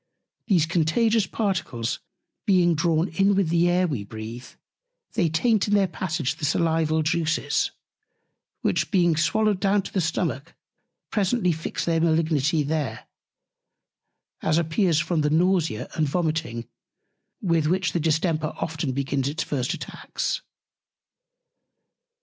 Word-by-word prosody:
These 180 -8 +4
Contagious 190 +7 +2
Particles 155 - -2 0.5
being 180 -3 +4
drawn 160 +2 +1
in 195 +4 +2
with 190 -4 +1
the 170 +1 +3
Air 180 +1 +3
we 135 - -2
breath, 110 +4 -9 0.6
they 180 -7 +2
taint 215 +7 +2
in 205 - +2
their 200 -1 +4
Passage 160 -5 -2
the - - -11
Salival 160 0 +1
Juices, 160 +1 0 0.9
which - - +1
being 175 -5 +3
swallowed 210 +5 +2
down 200 0 +2
into 200 -2 0
the 190 - +1
Stomach 160 -2 -2 0.6
presently 205 -2 +1
fix 160 0 -3
their 165 -1 +1
Malignity 160 -2 +2
there; 150 -1 -2 1.4
as 160 0 +2
appears 170 +1 +2
from 165 -1 0
the 150 - +1
Nausea 165 - +1
and 155 -3 0
Vomiting, 155 -8 -2 0.7
with 165 -5 +1
which 185 +2 +1
the 175 - -1
Distemper 160 0 0
often 160 -4 -2
begins 135 0 -1
its 155 +3 -2
first 130 -3 -2
Attacks. - - -4
165 Hz, 125 wpm, -25 LUFS, 155-185 Hz, 1.4 s, These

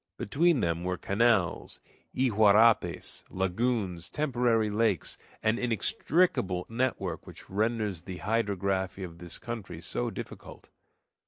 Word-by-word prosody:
Between 160 +6 +2
them 85 0 0
were 90 0 -1
canals, 100 0 +1 0.4
iguarapes, 110 -2 +3
lagoons, 95 -2 -1
temporary 120 -7 +1
lakes, 105 -5 0 0.2
an 110 +2 +2
inextricable 115 - +1
network 115 -8 -2
which - - -11
renders 105 -3 0
the 90 +1 -7
hydrography 100 -3 -1
of 85 -2 -8
this 85 -1 -5
country 115 -4 -6
so - - -2
difficult. - - -9
105 Hz, 105 wpm, -29 LUFS, 95-120 Hz, 0.4 s, iguarapes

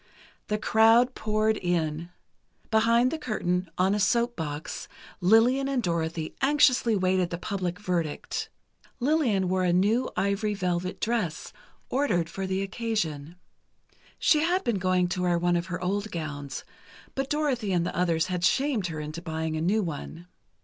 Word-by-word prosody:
The 210 - 0
crowd 225 +4 +4
poured 215 -1 0
in. 170 -2 -1 0.6
Behind 230 +3 +4
the 320 - -3
curtain, 180 - -1
on 190 +2 +3
a 210 - 0
soap 235 +3 +2
box, 150 -2 -5 0.3
Lillian 230 +8 +4
and 270 -3 0
Dorothy 165 -2 -2
anxiously 265 -5 +4
waited 185 -2 +1
the 170 - -4
public 180 -2 -3
verdict. 175 -6 -2 0.5
Lillian 245 - +2
wore 185 0 +1
a 180 - +2
new 210 +8 +2
ivory 200 +1 0
velvet 180 -2 -2
dress, 220 -9 -2 0.3
ordered 205 - 0
for 190 +3 -4
the 190 +1 -1
occasion. 190 -8 -3 0.8
She 305 - +4
had 350 +4 +1
been 230 -5 0
going 185 -1 +2
to 180 +1 -2
wear 175 -1 +2
one 175 0 +1
of 170 +1 -1
her 180 -1 -4
old 205 +3 -1
gowns, 145 -5 -5 0.5
but 270 0 -3
Dorothy 270 -9 0
and 175 -2 +1
the - - -4
others 165 -2 +1
had 180 -2 -3
shamed 245 0 +2
her 160 -2 -5
into 155 +2 -6
buying 160 -1 -3
a 155 - -2
new 205 +6 +2
one. 165 +1 -6
190 Hz, 155 wpm, -27 LUFS, 175-230 Hz, 0.8 s, crowd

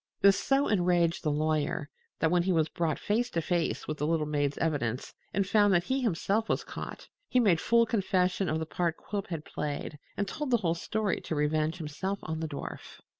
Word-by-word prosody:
This 200 0 +6
so 275 +1 +2
enraged 175 -4 +2
the 155 - 0
lawyer 150 -1 0 0.3
that, 160 0 +2
when 175 -1 +4
he 185 +2 +1
was 160 -3 +2
brought 160 -3 -1
face 235 +4 0
to 170 - -1
face 170 +1 -1
with 155 -1 -4
the 150 - 0
little 160 -1 +1
maid's 145 -1 0
evidence 135 -7 -1 0.2
and 195 +1 +1
found 205 -2 +4
that 175 - +3
he 265 +8 0
himself 220 0 0
was - - +1
caught, - - -7 0.2
he 255 - +3
made 190 -9 +4
full 235 0 +4
confession 190 -3 +1
of 155 - +1
the 160 - -2
part 170 0 -1
Quilp 200 -2 -4
had 160 -3 -5
played, 150 0 -4 0.2
and 200 - 0
told 300 +5 -3
the 240 - +4
whole 170 -6 +1
story 210 +4 -1
to 160 - -3
revenge 155 +2 +1
himself 175 +5 -3
on 160 0 -3
the 160 - -2
dwarf. 145 -2 -7
170 Hz, 210 wpm, -30 LUFS, 155-200 Hz, 0.3 s, This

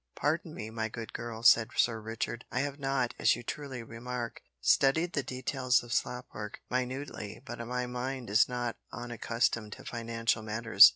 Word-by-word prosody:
"Pardon - - 0
me, 110 +1 -5
my 110 0 -2
good 115 0 -6
girl," 115 -1 -5
said 115 0 +7
Sir 115 -2 +3
Richard, 115 +1 -3
"I 130 - +1
have 140 0 -3
not, 135 -3 +1
as - - +5
you - - -7
truly 135 -2 -4
remark, 120 +1 -5 0.2
studied 150 - +4
the 145 - +2
details 130 -1 +1
of 120 -1 -5
slop 125 +1 0
work 105 0 -6
minutely, 125 -4 -2
but 120 -1 -6
my 125 0 -1
mind 125 +1 -3
is 105 +4 +5
not 120 -1 -2
unaccustomed 115 -2 -1
to - - -11
financial 115 -1 0
matters. 110 -1 +8
120 Hz, 170 wpm, -31 LUFS, 115-130 Hz, 0.2 s, matters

